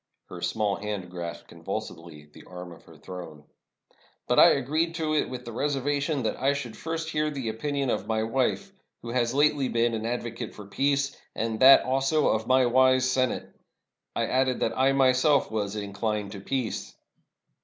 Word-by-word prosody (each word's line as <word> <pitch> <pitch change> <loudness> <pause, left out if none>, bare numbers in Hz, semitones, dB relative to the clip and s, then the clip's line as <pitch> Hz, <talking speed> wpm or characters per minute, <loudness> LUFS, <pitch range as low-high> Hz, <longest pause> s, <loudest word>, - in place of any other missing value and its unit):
Her - - -8
small 105 -2 0
hand 100 -3 -5
grasped 85 -1 -6
convulsively 80 -3 -7
the 75 - -16
arm 90 -1 -9
of 85 - -15
her - - -16
throne. 85 -5 -9 0.4
" - - -35
But - - +3
I - - +9
agreed 155 +5 -1
to 160 -2 -1
it 155 - +1
with 125 -1 -7
the 120 - -6
reservation 140 +2 -1
that 110 - -1
I 135 +2 +3
should 130 -6 -5
first 160 0 -4
hear 155 0 0
the 135 -6 -4
opinion 140 +3 -2
of - - -2
my 110 -1 0
wife, 130 - -1 0.3
who 120 - -6
has 120 0 0
lately 145 -2 +3
been 115 0 +1
an 110 0 -3
advocate 120 -1 -4
for 105 - -10
peace, 140 +6 0 0.2
and 110 -1 -2
that 135 +1 +8
also 135 +3 +2
of 110 0 0
my 130 0 +4
wise 130 +1 +4
Senate. 130 -1 -1 0.6
I - - +1
added 130 0 0
that 115 - 0
I 135 +1 +3
myself 135 +1 +3
was 105 -2 -2
inclined 105 0 -3
to 100 - -7
peace." 125 +1 -3
125 Hz, 180 wpm, -27 LUFS, 110-140 Hz, 0.6 s, I